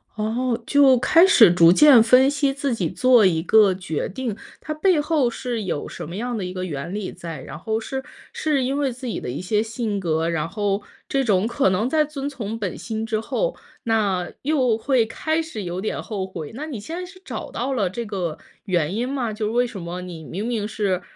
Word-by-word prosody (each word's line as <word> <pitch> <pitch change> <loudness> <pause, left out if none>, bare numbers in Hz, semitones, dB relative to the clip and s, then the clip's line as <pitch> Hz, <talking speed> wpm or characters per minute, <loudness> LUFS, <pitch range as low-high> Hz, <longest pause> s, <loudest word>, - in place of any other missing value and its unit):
哦， 230 +3 -1
就 275 -3 +5
开 330 +8 +5
始 230 - +7
逐 170 -1 +7
渐 280 +1 +8
分 255 +4 +5
析 285 -1 +1
自 275 -1 -2
己 185 -8 -1
做 250 -4 +4
一 165 -4 +2
个 210 +1 +5
决 180 -5 -3
定， 225 0 -4 0.2
它 310 - -4
背 330 +2 +2
后 295 -5 +1
是 235 -2 -4
有 170 -6 -3
什 - - -7
么 170 - -7
样 240 +3 -3
的 195 - -3
一 180 - -5
个 185 0 -4
原 150 +1 -5
理 205 -2 -4
在， 165 -5 -8
然 150 - -9
后 220 +4 -2
是 265 +4 -5 0.3
是 295 -4 0
因 270 +2 -1
为 280 -2 0
自 255 +1 -8
己 230 - -3
的 - - -6
一 130 - -4
些 210 +3 +1
性 220 -2 -3
格， 165 -2 0
然 165 -2 -1
后 200 +1 -1 0.3
这 270 0 +1
种 200 -5 +2
可 240 -2 +2
能 205 +6 0
在 305 +1 +3
遵 285 -2 -5
从 225 -5 -5
本 200 -5 -4
心 220 -1 -4
之 220 -1 -1
后， - - -2 0.3
那 200 -6 0
又 260 -6 +2
会 245 0 +2
开 315 +8 -1
始 320 -10 -6
有 180 +1 -4
点 215 - -3
后 200 -4 -4
悔， 170 -5 -7
那 290 +5 -5
你 270 -8 -5
现 320 +11 -7
在 365 - -4
是 370 +1 -15
找 - - -6
到 265 +3 -2
了 205 -8 0
这 235 +6 -5
个 185 -7 -3 0.3
原 175 -3 0
因 245 +3 -1
吗？ 245 -6 -2
就 215 0 -2
为 245 +1 +2
什 205 -5 -8
么 170 +1 -5
你 175 -3 -8
明 195 +8 -5
明 225 -4 -1
是， 200 -4 -1
220 Hz, 240 characters per minute, -22 LUFS, 185-260 Hz, 0.3 s, 渐